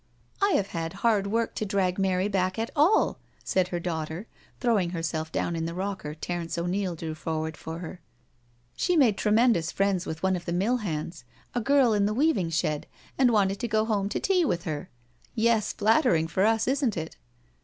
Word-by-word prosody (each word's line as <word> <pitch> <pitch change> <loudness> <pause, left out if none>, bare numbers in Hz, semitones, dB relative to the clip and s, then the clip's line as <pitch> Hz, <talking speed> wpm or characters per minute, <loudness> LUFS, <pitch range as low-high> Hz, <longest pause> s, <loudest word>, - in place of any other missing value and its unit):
" - - -38
I 400 -1 +3
have 200 -1 +1
had 165 0 -4
hard 210 -4 +3
work 230 +3 0
to - - -3
drag 195 -2 0
Mary 190 0 +1
back 185 -2 0
at 225 +1 -2
all," 315 +9 +3 0.2
said 185 -1 +1
her 175 -1 -3
daughter, 165 +2 -4 0.3
throwing 220 -8 +2
herself 160 -1 -3
down 170 - -1
in 165 0 -2
the 170 - -5
rocker 185 -5 -4
Terence 170 +1 -4
O'Neil 180 +1 -1
drew 160 -1 -5
forward 160 0 -3
for 160 0 -7
her. 175 +1 -8 0.4
" 120 0 -38
She 360 -2 +1
made 245 -9 +5
tremendous 215 -5 +2
friends 195 -2 0
with 160 +2 -5
one 190 0 +2
of 175 - -6
the 170 - -2
mill 205 +8 +1
hands— 165 - -4 0.3
a 245 - 0
girl 270 -1 +4
in 205 -1 +2
the 215 - -1
weaving 245 - +2
shed— 155 -2 -1 0.3
and 260 -2 +4
wanted 200 -3 +2
to 240 - -2
go 215 0 +1
home 205 -3 0
to - - -2
tea 375 -2 +2
with 175 - 0
her 160 +1 -4
I 120 0 -34
Yes, 225 -2 +2
flattering 215 - +3
for 190 +5 +2
us, 225 0 +1
isn't 265 -6 +1
it?" 160 -1 -5
190 Hz, 205 wpm, -27 LUFS, 165-220 Hz, 0.4 s, made